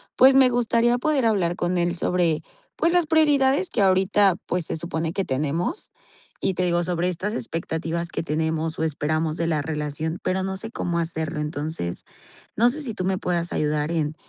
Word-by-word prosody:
pues, 265 +1 +7
me 265 -1 +7
gustaría 240 0 +2
poder 280 -1 +1
hablar 190 -6 +1
con 175 +1 0
él 175 0 +1
sobre, 170 -2 +1 0.3
pues, 335 +1 +2
las 350 -3 +3
prioridades 295 0 +3
que 225 - +1
ahorita, 190 0 +4
pues, 180 -2 -1
se - - -2
supone 160 0 -3
que 195 0 -1
tenemos. 150 - -2 0.5
Y 190 - +1
te 180 - 0
digo, 175 0 +1
sobre 175 0 -1
estas 185 +4 -3
expectativas 165 -3 -3
que - - -3
tenemos 160 0 -1
o - - 0
esperamos 155 +1 -1
de 165 - -1
la 155 -3 +1
relación, 155 +2 -3
pero 185 +1 0
no 190 0 -3
sé 225 +4 -7
cómo 170 -6 -2
hacerlo. 160 -2 -3
Entonces, 150 - -4 0.5
no 235 +3 +4
sé 300 +5 -4
si 250 -6 -4
tú 185 -3 -4
me 190 0 +1
puedas 175 -1 -2
ayudar 150 +1 0
en, 155 -2 -1
175 Hz, 190 wpm, -24 LUFS, 160-210 Hz, 0.5 s, pues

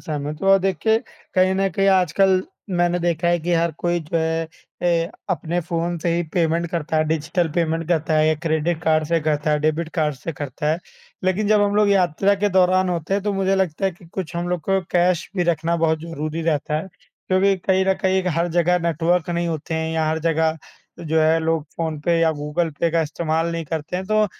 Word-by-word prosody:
सहमत 150 -1 -4
हूँ 195 - +2
और 195 - +7
देखिए 195 +4 +1 0.4
कहीं 185 0 +3
न 195 0 +1
कहीं 195 +4 +1
आजकल 190 0 +3 0.3
मैंने 175 0 +1
देखा 170 0 0
है 175 0 +3
कि 175 +2 -1
हर 170 0 +1
कोई 175 0 0
जो 160 +1 -3
है 160 0 0 0.6
अ, - - -12 0.2
अपने 175 -1 -1
फ़ोन 170 +1 -2
से 170 +1 0
ही 175 - +1
पेमेंट 170 -1 +1
करता 165 -2 -2
है, 155 - +3
डिजिटल 160 +2 0
पेमेंट 165 -1 0
करता 160 -2 +1
है 155 0 +4
या 155 - +3
क्रेडिट 160 +1 0
कार्ड 155 -1 +2
से 165 -1 +2
करता 150 0 0
है, 150 - +2
डेबिट 155 +2 0
कार्ड 150 -2 0
से 160 +5 -6
करता 145 +1 -3
है। 160 - 0 0.5
लेकिन 190 +3 +1
जब 215 -1 +4
हम 205 0 +1
लोग 210 -1 +4
यात्रा 195 +1 +3
के 205 +1 0
दौरान 185 0 +3
होते 175 +1 -1
हैं, 200 - 0
तो 205 -1 -1
मुझे 195 0 +1
लगता 190 -1 -1
है 195 - +3
कि 175 - -19
कुछ 175 0 -6
हम 175 +1 -2
लोग 180 -2 -1
को 195 +2 +1
कैश 175 0 +2
भी 180 - +2
रखना 170 0 0
बहुत 160 -1 +1
ज़रूरी 165 0 -4
रहता 150 -2 0
है 165 - -6 0.4
क्योंकि 190 +1 +3
कहीं 190 +1 +1
न 190 - +3
कहीं 190 0 +2
एक 185 - -2
हर 170 +1 +1
जगह 180 +1 +3
नेटवर्क 170 +2 0
नहीं 170 0 -1
होते 160 0 -4
हैं 160 0 -1
या 160 -1 0
हर 160 0 0
जगह 160 0 +1 0.4
जो 160 -1 0
है 160 +1 +4
लोग 160 -1 0
फ़ोन 160 -2 -2
पे 170 +2 +1
या 165 - +4
गूगल 150 +3 -2
पे 170 - +2
का 165 0 +2
इस्तेमाल 160 +1 -1
नहीं 165 -1 -3
करते 160 +3 -4
हैं, 185 - -3
तो 215 0 +3
170 Hz, 225 wpm, -21 LUFS, 160-185 Hz, 0.6 s, और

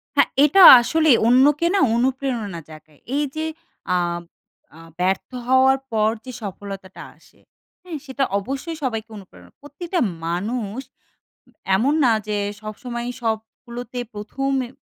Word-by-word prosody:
হ্যাঁ, - - +4 0.2
এটা 340 +7 +4 0.2
আসলে 315 +5 +1 0.2
অন্যকে 285 +7 +4
না, - - +3 0.2
অনুপ্রেরণা 245 -6 -2
জাগায়। 155 -1 -15 0.2
এইযে 295 +2 -2 0.5
আব 175 -1 -2 0.6
আ - - -14 0.2
ব্যর্থ 185 +1 0 0.2
হওয়ার 260 +1 +4
পর 215 -1 +2 0.2
যে 255 - -7
সফলতাটা 195 -1 -8
আসে। - - -25 0.4
হ্যাঁ, 350 -4 -6
সেটা 270 0 -2 0.2
অবশ্যই 270 - -5
সবাইকে 225 -4 -3
অনুপ্রেরণা 190 -2 -15
প্রতিটা 335 +5 -4 0.3
মানুষ 210 +6 -3 1.0
এমন 265 +9 +1
না 240 - +4 0.2
যে, 210 - -1 0.3
সবসময়ই 240 +3 -6
সবগুলোতে 235 +2 -5 0.2
১ম 220 +7 -4 0.2
এ - - -12
240 Hz, 120 wpm, -21 LUFS, 205-275 Hz, 1.0 s, হ্যাঁ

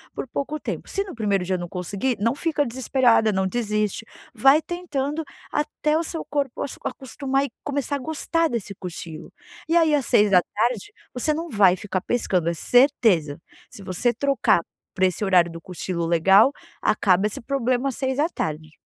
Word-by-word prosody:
por - - -4
pouco 290 +5 -4
tempo - - -5
se 395 - -1
no 390 - -9
primeiro 205 -5 0
dia 185 -1 -1
não 175 - -5
conseguir 200 +7 -2
não 230 +4 +1
fica 295 0 0
desesperada 240 -2 +2
não 190 -1 0
desiste, 215 -1 -1 0.3
vai 270 +7 +5
tentando 320 -3 -3 0.3
até 300 +1 -1
o 335 - 0
seu 325 0 -4
corpo 280 -4 -2 0.2
acostumar 270 +1 -2
e 255 - -8
começar 285 0 -2
a - - -8
gostar 320 +3 -1
desse 215 -4 -4
cochilo. 170 -3 -8 0.4
E 340 - +4
aí 320 -2 +4
às 280 -4 +2
18h 210 - +2 0.2
você 280 +5 0
não 330 +1 -5
vai 195 -5 +5
ficar 190 -2 -3
pescando, 185 -9 0
é - - -1
certeza, 220 - +3 0.3
se 200 - -11
você 190 +7 +1
trocar 260 -7 +2 0.3
para 185 - +3
esse 185 +3 -1
horário 180 -3 +4
do 165 0 -9
cochilo 175 -1 -4
legal, 190 - +5 0.3
acaba 195 -1 +3
esse 210 - -5
problema 255 +1 0
às 255 - -5
18h. 260 - -2
235 Hz, 165 wpm, -23 LUFS, 190-280 Hz, 0.4 s, vai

